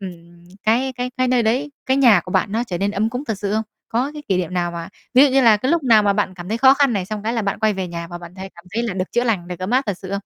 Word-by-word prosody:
ừm, 175 Hz, -2 st, -11 dB, 0.2 s
cái 250 Hz, +4 st, +1 dB
cái 250 Hz, 0 st, -3 dB
cái 255 Hz, -1 st, +1 dB
nơi 250 Hz, -2 st, +2 dB
đấy, 255 Hz, +7 st, 0 dB, 0.2 s
cái 265 Hz, +1 st, +2 dB
nhà 235 Hz, -9 st, +6 dB
của 180 Hz, -, -9 dB
bạn 200 Hz, -, +1 dB
nó 230 Hz, +2 st, 0 dB
trở 175 Hz, -4 st, -4 dB
nên 200 Hz, +1 st, 0 dB
ấm 215 Hz, +2 st, -1 dB
cúng 250 Hz, +4 st, -5 dB
thật 220 Hz, -8 st, -3 dB
sự 200 Hz, 0 st, -3 dB
không? 220 Hz, +1 st, +1 dB, 0.3 s
Có 250 Hz, +5 st, -1 dB
cái 300 Hz, -, -9 dB
kỷ 190 Hz, -, +2 dB
niệm 180 Hz, 0 st, -3 dB
nào 175 Hz, -1 st, 0 dB
mà 170 Hz, -1 st, -6 dB, 0.3 s
ví 260 Hz, -, +8 dB
dụ 290 Hz, -, +4 dB
như 270 Hz, -, +4 dB
là 225 Hz, -3 st, +6 dB
cái 255 Hz, +6 st, -2 dB
lúc 335 Hz, -3 st, +2 dB
nào 225 Hz, -4 st, +5 dB
mà 200 Hz, -1 st, +3 dB
bạn 200 Hz, -2 st, -1 dB
cảm 180 Hz, +1 st, -9 dB
thấy 225 Hz, -, -2 dB
khó 265 Hz, +2 st, +6 dB
khăn 280 Hz, -3 st, +2 dB
này, 190 Hz, -3 st, -2 dB
xong 210 Hz, 0 st, -5 dB
cái 225 Hz, +2 st, -1 dB
là 230 Hz, -2 st, -1 dB
bạn 200 Hz, -, -2 dB
quay 215 Hz, -1 st, +2 dB
về 190 Hz, -2 st, -4 dB
nhà 170 Hz, 0 st, -6 dB
và 175 Hz, 0 st, -7 dB
bạn 175 Hz, +1 st, -12 dB
thấy 190 Hz, 0 st, -8 dB
cảm 170 Hz, -, -16 dB
thấy 235 Hz, -, 0 dB
là 230 Hz, -5 st, -3 dB
được 185 Hz, 0 st, -4 dB
chữa 240 Hz, +1 st, +1 dB
lành, 195 Hz, -7 st, -1 dB
được 180 Hz, -, -6 dB
ấm 185 Hz, +4 st, -4 dB
áp 260 Hz, +2 st, +3 dB
thật 200 Hz, -4 st, -3 dB
sự 190 Hz, -, -9 dB
không? 195 Hz, -, -6 dB
210 Hz, 350 wpm, -20 LUFS, 185-245 Hz, 0.3 s, ví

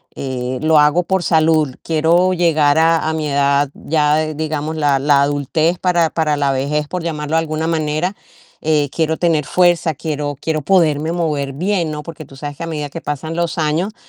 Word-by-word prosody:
Eh, 130 Hz, -1 st, -4 dB
lo 155 Hz, -1 st, +4 dB
hago 150 Hz, +4 st, +3 dB
por 190 Hz, +1 st, 0 dB
salud. 155 Hz, -4 st, +2 dB
Quiero 165 Hz, +3 st, +2 dB
llegar 160 Hz, -4 st, +2 dB
a, 165 Hz, -1 st, +3 dB
a -, -, 0 dB
mi 155 Hz, -1 st, -2 dB
edad 140 Hz, 0 st, +2 dB
ya, 155 Hz, 0 st, 0 dB
digamos, 155 Hz, 0 st, -3 dB
la 145 Hz, -3 st, +2 dB
la 140 Hz, 0 st, +3 dB
adultez 155 Hz, +4 st, 0 dB
para 175 Hz, -3 st, +2 dB
para 150 Hz, -2 st, 0 dB
la 140 Hz, -1 st, +1 dB
vejez, 145 Hz, +3 st, -1 dB
por 180 Hz, 0 st, -4 dB
llamarlo 155 Hz, -1 st, -3 dB
de -, -, +4 dB
alguna 160 Hz, 0 st, -3 dB
manera. 160 Hz, +3 st, -1 dB, 0.5 s
Eh, 150 Hz, -2 st, +1 dB
quiero 160 Hz, -1 st, -1 dB
tener 160 Hz, -5 st, +1 dB
fuerza, 175 Hz, -3 st, +2 dB
quiero 145 Hz, -1 st, -4 dB
quiero 155 Hz, -1 st, -1 dB
poderme 160 Hz, -4 st, +2 dB
mover 150 Hz, -5 st, -1 dB
bien, 175 Hz, 0 st, -1 dB
¿no? 150 Hz, 0 st, -5 dB
Porque 160 Hz, 0 st, -9 dB
tú 135 Hz, -, -15 dB
sabes 145 Hz, 0 st, -6 dB
que -, -, -6 dB
a -, -, -4 dB
medida 150 Hz, -3 st, -4 dB
que 165 Hz, +3 st, -8 dB
pasan 155 Hz, +3 st, -4 dB
los 170 Hz, 0 st, -2 dB
años, 160 Hz, +7 st, 0 dB
155 Hz, 190 wpm, -17 LUFS, 145-165 Hz, 0.5 s, lo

